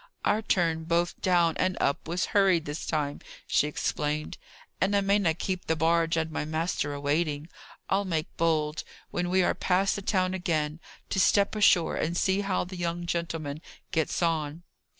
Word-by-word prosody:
"Our 210 +1 +2
turn 165 -6 +1
both 170 +1 0
down 175 -3 +3
and 185 0 0
up 140 - 0
was 175 +2 0
hurried 190 -5 +4
this 150 +2 -5
time," 145 -2 -2 0.2
she 150 - +2
explained, 150 0 -2 0.4
"and 200 +2 +2
I 200 - +4
mayna 195 -4 +2
keep 185 +1 -3
the 160 - +2
barge 165 +1 +2
and 160 0 -1
my - - -2
master 155 -1 -1
a - - -5
waiting. 150 +1 -1 0.4
I'll 195 +1 +1
make 165 -2 -3
bold, 155 -2 0 0.3
when 175 0 -1
we 185 0 +3
are - - +2
past 190 +2 +1
the 200 - -4
town 185 -1 +1
again, 160 -4 -1 0.3
to 195 - +1
step 200 +3 +3
ashore, 190 -5 +4
and 170 +2 -1
see 190 +1 +2
how 195 -2 0
the 180 +1 -8
young 175 0 -2
gentleman 165 -4 -3 0.3
gets 160 +2 0
on." 160 -1 -1
170 Hz, 175 wpm, -28 LUFS, 155-185 Hz, 0.4 s, hurried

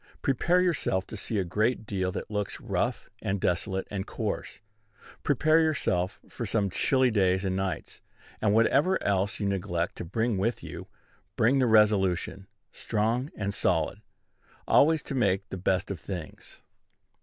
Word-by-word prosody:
Prepare 170 +7 +2
yourself 160 - 0
to - - -8
see 110 +2 -3
a 95 - +2
great 110 +6 0
deal 95 -3 -1
that 105 - -6
looks 105 -1 -2
rough - - -2
and 95 +1 -1
desolate 95 +2 -1
and 95 -2 -3
coarse; - - -4 0.6
prepare 155 +3 +3
yourself 100 - 0
for - - -6
some 100 -3 0
chilly 130 +5 +2
days 95 -2 +2
and 95 -1 0
nights; 95 -1 -3 0.4
and, 105 - +3
whatever 140 - +3
else 100 0 0
you 100 - -1
neglect 90 -3 -1
to - - -4
bring 110 +4 -1
with 115 +5 -1
you, - - -8 0.5
bring 130 +5 +3
the 130 - +3
resolution, 100 -3 +2 0.2
strong 115 +5 -1
and 100 -1 -2
solid, - - 0 0.7
always 160 0 +4
to - - -5
make 100 -6 +1
the - - -5
best 95 +1 0
of 95 - -5
things. 90 -5 -8
100 Hz, 155 wpm, -28 LUFS, 95-120 Hz, 0.7 s, always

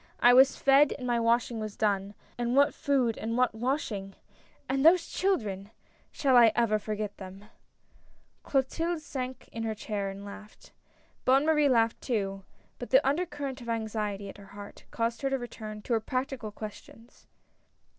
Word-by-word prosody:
I 245 - +6
was 265 +2 +6
fed 275 +1 +5
and 255 - -7
my 240 -1 +1
washing 230 0 +1
was 215 -1 -6
done 200 -1 0
— - - -32
and 240 +1 0
what 280 +1 +4
food 255 -5 0
and 230 +2 -2
what 250 -2 +2
washing! 220 -5 -3 0.5
and 270 +1 0
those 335 +2 +6
children 210 - -1 0.2
— - - -36
shall 270 -3 +2
I 235 -2 +7
ever 220 -3 +2
forget 210 -1 -4
them! 190 +1 -10 0.5
" - - -34
Clotilde 320 +5 -1
sank 260 -3 -5
back - - -20
in 230 - -6
her 220 -1 -2
chair 205 -2 -3
and 195 +1 -8
laughed. 210 +1 -12 0.5
Bonne 270 +3 +4
Marie 300 -2 +3
laughed 230 -3 +2
too, 195 -5 -2 0.4
but - - -6
the - - +4
under 330 +6 +1
current 280 -4 -6
of 235 - -8
anxiety 215 -3 -3
at 195 - -10
her 200 - -13
heart, 205 0 -11
caused 230 0 -2
her 275 - 0
to 270 - 0
return 215 -4 -8
to 245 - -2
her 225 - +3
practical 255 -1 -4
ques 210 0 -8
tions. 230 +3 -19
235 Hz, 185 wpm, -29 LUFS, 210-270 Hz, 0.5 s, I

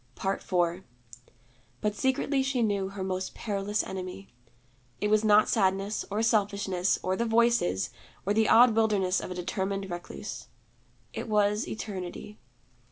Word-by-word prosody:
IV 180 -2 0 1.0
But 210 -1 0
secretly 265 +4 +1
she 265 -2 0
knew 200 -3 0
her 195 -1 -5
most 185 0 -3
perilous 205 -1 -1
enemy. 190 +1 -7 0.7
It 210 0 0
was 215 0 +4
not 210 0 +5
sadness, 195 0 +1
or 210 +2 -1
selfishness, 200 -4 +1
or 185 0 0
the 235 - -1
Voices, 225 - +2 0.3
or 200 - +2
the 220 0 +2
odd 235 -1 +7
wilderness 205 -5 +2
of - - -6
a 180 - -5
determined 195 +1 -3
recluse. 175 0 -7 0.7
It - - -5
was 210 0 +2
Eternity. 205 0 -6
205 Hz, 135 wpm, -28 LUFS, 190-220 Hz, 1.0 s, odd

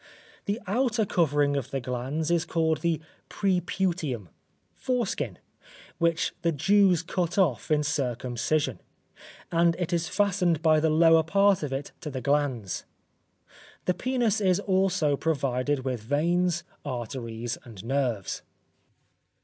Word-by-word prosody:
The 205 +3 -1
outer 230 +2 +1
covering 145 -6 +2
of 135 -2 -2
the 135 - -2
glans 130 +6 -2
is 170 -2 +2
called 160 -2 0
the 170 -2 +1 0.3
preputium 180 - -1 0.4
(foreskin), 195 - -2 0.6
which 165 -1 +1
the 170 - +2
Jews 185 +2 +3
cut 175 0 -2
off 165 - +2
in 150 -1 +3
circumcision, 135 0 -1 0.7
and 170 0 +3
it 175 -1 -2
is 170 -1 0
fastened 180 -5 +1
by 155 -1 +5
the 160 +1 +2
lower 165 +1 +6
part 195 +4 +3
of 150 -3 -3
it 135 +2 -4
to 155 - -5
the 130 -2 -4
glans. 130 -6 0 1.0
The 180 - +2
penis 240 -2 0
is 185 -1 +3
also 185 -6 +2
provided 135 -2 -1
with 125 -4 -2
veins, 170 +7 +1 0.2
arteries 120 -3 -4
and 110 -5 -11
nerves. 125 -6 -1
160 Hz, 125 wpm, -27 LUFS, 135-180 Hz, 1.0 s, lower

